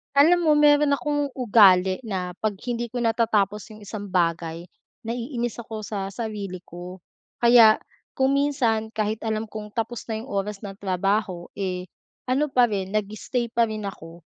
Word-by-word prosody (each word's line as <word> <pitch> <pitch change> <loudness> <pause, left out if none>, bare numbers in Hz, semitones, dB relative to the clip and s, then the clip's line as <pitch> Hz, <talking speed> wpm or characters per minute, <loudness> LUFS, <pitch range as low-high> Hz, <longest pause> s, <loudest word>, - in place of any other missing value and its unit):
Alam 335 +4 +5
mo 305 - +6
mayro'n 295 -1 +5
akong 290 0 -1
ugali 195 -6 +5
na 185 -4 -3
'pag 215 -1 -1 0.2
hindi 240 0 -2
ko 245 +1 -4
natatapos 215 -3 +1
yung 215 - -14
isang 205 0 -6
bagay, 170 -3 -1 0.4
naiinis 240 0 -3
ako 220 -2 -6
sa 200 -2 -4
sarili 200 -3 -5
ko. 180 +1 -10 0.4
Kaya, 235 -2 +7 0.3
kung 265 0 +2
minsan 255 -6 +1
kahit 215 0 -1
alam 220 0 -2
kong 210 -1 -8
tapos 230 0 -3
na 220 -1 -4
yung 265 - -12
oras 200 +1 -3
ng 195 -1 -8
trabaho, 195 -1 -1
eh, 180 -2 -3 0.4
ano 275 +4 +2
pa 250 -4 +3
rin 195 -1 -3
nag-stay 215 +3 -2
pa 235 0 +2
rin 215 -1 -5
ako. 170 -4 -8
215 Hz, 160 wpm, -24 LUFS, 195-240 Hz, 0.4 s, Kaya